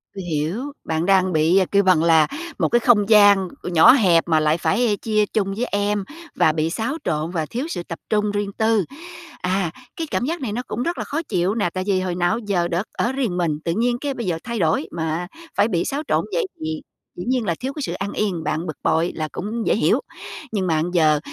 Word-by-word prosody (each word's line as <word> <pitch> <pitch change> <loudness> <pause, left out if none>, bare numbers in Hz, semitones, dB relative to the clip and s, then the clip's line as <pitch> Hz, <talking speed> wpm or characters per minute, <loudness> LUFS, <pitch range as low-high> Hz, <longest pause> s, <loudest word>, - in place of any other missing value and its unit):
Tui 190 - -5
hiểu, 175 - -2
bạn 160 +1 -1
đang 185 -1 +3
bị, 160 +5 +4
kêu 200 0 +4
bằng 180 -4 +4
là, 160 -2 +5 0.3
một - - +2
cái 240 - +3
không 225 -4 +3
gian 205 -3 +6 0.2
nhỏ 175 -3 +6
hẹp 185 -11 +4
mà 160 -2 +3
lại 155 +1 +2
phải 210 +4 +1
chia 215 -1 +2
chung 195 -2 -1
với 240 +4 -1
em 205 -1 -1 0.3
và 155 - +4
bị 155 +1 -1
xáo 230 - -2
trộn 155 +1 -1
và 160 -4 -1
thiếu 250 - -4
sự 175 - -4
tập 165 -1 -7
trung 210 -1 +1
riêng 205 -1 -2
tư. 220 -4 +2 0.6
À, 180 -2 0 0.2
cái 325 -1 -4
cảm 245 - -1
giác 330 +3 -3
này 240 -6 -3
nó 235 - -2
cũng 240 - -3
rất 340 +5 -2
là - - -2
khó 315 +3 -3
chịu 190 - -1
nè, 205 -6 +1
tại 185 +2 -4
vì 190 -2 +2
hồi 180 -2 -2
nào 175 0 +1
á 225 - -1
giờ 175 -4 +1
được 175 +5 -2
ở 235 - 0
riêng 245 -9 -1
mình, 155 -4 0
tự 165 - +1
nhiên 240 +1 +1
cái 285 -1 -2
bây 240 -3 -5
giờ 175 -3 -1
thay 235 -3 -4
đổi, 160 -1 +1
mà 165 +1 -2 0.3
phải 205 +2 +3
bị 175 -6 0
xáo 285 +2 -2
trộn - - +1
vậy 480 - +1
thì 155 0 -4 0.3
dĩ 175 - -6
nhiên 250 -3 +1
là 170 - 0
thiếu 265 +2 -4
cái 300 - -6
sự - - -3
an 200 +1 -4
yên, 185 -6 -2
bạn 165 +3 -2
bực 155 - -5
bội 165 +2 +2
là 155 -1 -2
cũng 220 +4 -4
dễ - - +3
hiểu. - - +2 0.5
Nhưng 195 -4 -1
mà 165 - +2
bây 165 +3 -1
giờ 155 -4 +3
190 Hz, 245 wpm, -22 LUFS, 165-225 Hz, 0.6 s, gian